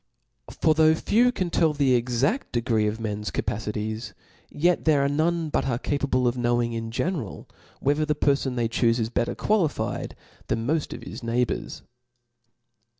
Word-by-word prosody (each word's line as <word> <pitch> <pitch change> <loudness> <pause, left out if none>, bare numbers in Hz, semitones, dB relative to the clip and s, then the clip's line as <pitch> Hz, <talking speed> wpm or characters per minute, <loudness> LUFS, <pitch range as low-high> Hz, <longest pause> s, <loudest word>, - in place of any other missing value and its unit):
For 155 - +4
though 160 0 +5
few 240 +9 +3
can 185 -7 -3
tell 160 -2 +3
the 140 -3 +2
exaft 130 - -1
de 120 - +1
gree 110 -3 +1
of 105 +2 -3
men's 105 -1 -3
capacities, 110 +1 -3 0.3
yet 175 +3 +1
there 145 -3 +4
are - - +3
none 160 +3 0
but - - 0
are 120 -3 0
capable 135 -2 0
of 120 - +1
knowing 120 -1 0
in 115 0 -4
general, 130 - -3 0.3
whether 145 +2 +2
the 150 0 0
perfon 140 -2 +1
they 120 -2 +1
chufe 115 0 +2
is 115 -1 -2
better 120 - -1
qualified 190 -9 -1 0.3
than 115 0 -1
moft 155 +3 -1
of - - -10
his - - -8
neighbours. 120 +1 -2
130 Hz, 165 wpm, -25 LUFS, 115-155 Hz, 0.3 s, though